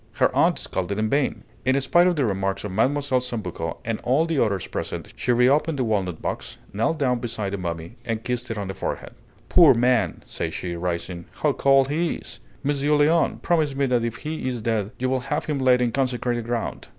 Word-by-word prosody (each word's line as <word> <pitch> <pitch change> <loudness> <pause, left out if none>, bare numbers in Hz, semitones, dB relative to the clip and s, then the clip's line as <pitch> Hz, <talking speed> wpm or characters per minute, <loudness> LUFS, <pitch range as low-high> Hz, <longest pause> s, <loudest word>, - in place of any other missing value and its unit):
Her - - +2
aunt - - +4
scolded 95 +2 -3
in 110 0 0
vain; 140 0 0 0.2
in 130 +1 +3
spite 175 +6 +4
of 180 - +2
the 145 -4 +1
remarks 95 -2 -1
of 105 - -4
Mlle. 130 +9 +2
Sambucco 120 - -2
and 115 -1 -2
all 135 +6 +2
the 160 -6 +2
others 100 -4 -1
present, - - -5
she 125 - 0
reopened 140 +6 +3
the 130 - +1
walnut 95 -7 -1
box, - - -4 0.2
knelt 115 +10 0
down 125 -4 +1
beside 110 -4 -3
the 100 - -2
mummy, 85 +4 -5
and 115 -2 -3
kissed 125 0 -3
it 115 - -3
on 100 -2 -3
the 95 - -4
forehead. - - -4 0.4
"Poor 165 -7 +7
man!" 125 0 +1
said - - -4
she, 90 -1 -4
rising. 85 0 -3 0.2
"How 150 -2 +4
cold 135 0 +4
he 165 +3 0
is! - - -9 0.2
Monsieur 145 +1 +1
Léon, 155 +3 +3
promise 155 -5 +1
me 140 0 +1
that 125 -3 +1
if 115 -1 -2
he 155 -3 -4
is 120 -4 -3
dead 110 -3 0
you 130 - -1
will 130 0 +1
have 150 +1 -1
him 150 -3 -1
laid 125 -1 +4
in 120 - +1
consecrated 125 -2 -1
ground!" 115 -1 -3
125 Hz, 210 wpm, -24 LUFS, 105-140 Hz, 0.4 s, Poor